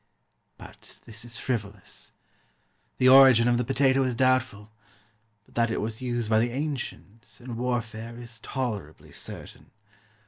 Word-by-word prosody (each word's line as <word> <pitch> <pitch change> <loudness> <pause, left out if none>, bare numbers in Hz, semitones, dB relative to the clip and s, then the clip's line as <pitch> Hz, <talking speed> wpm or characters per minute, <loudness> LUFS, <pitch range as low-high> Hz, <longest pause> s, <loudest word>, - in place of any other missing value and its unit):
But - - -14
this 115 0 -7
is 120 -1 -5
frivolous. 105 -6 -5 0.9
The 130 - +3
origin 130 -3 +8
of 120 0 +3
the - - +1
potato 135 +1 +2
is 130 -2 0
doubtful; 130 -4 +1 0.7
but - - -24
that 115 0 +1
it 115 - -2
was 110 +2 -4
used 120 -3 -2
by 110 0 +3
the 120 +2 +1
ancients, 125 -5 -6
in 120 -1 -7
warfare, 115 -1 -3
is 115 -1 -10
tolerably 110 - -5
certain. - - -10
120 Hz, 140 wpm, -26 LUFS, 115-130 Hz, 0.9 s, origin